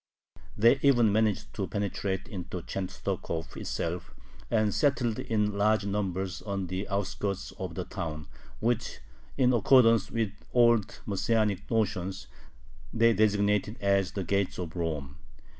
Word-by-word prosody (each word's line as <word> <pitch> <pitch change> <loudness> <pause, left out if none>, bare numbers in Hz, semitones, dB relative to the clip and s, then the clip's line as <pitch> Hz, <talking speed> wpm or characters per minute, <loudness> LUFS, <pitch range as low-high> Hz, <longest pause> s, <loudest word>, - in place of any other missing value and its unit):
They 115 +5 +5
even 120 -6 +5
managed 105 -1 +1
to 100 -3 -3
penetrate 100 -1 -2
into 90 -5 -6
Chenstokhov 85 -3 -4
itself, 85 +1 -4 0.3
and 110 -2 +2
settled 125 -6 +1
in 105 -2 0
large 105 0 +2
numbers 95 -2 -2
on 100 -2 -3
the 95 +3 -4
outskirts 100 0 -2
of - - -5
the - - -3
town, 75 -2 -5 0.3
which, 115 -1 -1 0.4
in 130 -2 +4
accordance 115 -2 +5
with 115 -3 -1 0.2
old 120 -3 +3
Messianic 105 0 0
notions, 95 -4 -1 0.7
they 115 0 +4
designated 105 +1 +2
as 100 -1 +1
"the 95 - -2
gates 100 +2 0
of 85 -2 -5
Rome." 75 -5 -3
100 Hz, 125 wpm, -29 LUFS, 95-110 Hz, 0.7 s, They